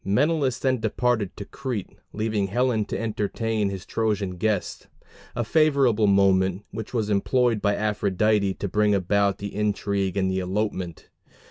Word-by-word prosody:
Menelaus 135 +5 +1
then 130 -2 0
departed 110 -2 0
to 100 - -6
Crete, 125 -7 -5 0.2
leaving 105 -2 -1
Helen 115 +1 +1
to - - -4
entertain 110 -1 -1
his 95 -2 -6
Trojan 105 -5 -1
guest 105 0 -2 0.5
a 120 - 0
favorable 135 -6 +3
moment, 95 0 +3
which 110 0 -6
was 110 -4 -1
employed 115 +2 +2
by 100 -1 +2
Aphrodite 105 -1 +1
to 100 - -4
bring 105 +1 +2
about 100 +1 +1
the 100 0 -6
intrigue 100 -2 -1
and 95 -1 +1
the 95 - 0
elopement. 95 -2 -3
105 Hz, 145 wpm, -25 LUFS, 100-115 Hz, 0.5 s, favorable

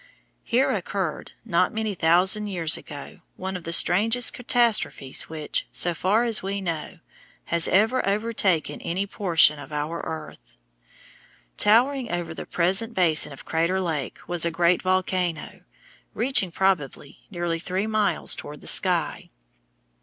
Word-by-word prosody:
Here 250 +2 +1
occurred, - - -4
not - - +1
many 220 -1 -2
thousand 185 +5 +3
years 170 -5 +1
ago, 145 -2 -9 0.2
one 190 +1 -5
of 180 - -7
the 165 - -4
strangest 225 +8 +4
catastrophes 235 - 0
which, 155 -2 -3
so 175 - +3
far 195 +8 +1
as 230 -3 0
we 195 +1 -3
know, 170 -1 -5 0.6
has 170 -1 +1
ever 225 +7 +2
overtaken 200 -6 0
any 185 +4 -2
portion 170 -7 +3
of 145 - -11
our 150 +3 -3
earth. 155 - -8 1.0
Towering 245 +4 +2
over 175 -2 -3
the - - -8
present 195 +7 0
basin 160 -5 +2
of 135 - -12
Crater 170 +4 0
Lake 160 -8 -3
was 175 -2 -1
a 170 - +3
great 170 +1 +2
volcano, 185 -3 -1 0.5
reaching, 230 -7 +1
probably, 165 -7 -1
nearly 175 -3 -3
three 185 +4 -2
miles 215 -2 0
toward 150 0 -8
the - - -15
sky. - - +1
180 Hz, 140 wpm, -24 LUFS, 165-210 Hz, 1.0 s, strangest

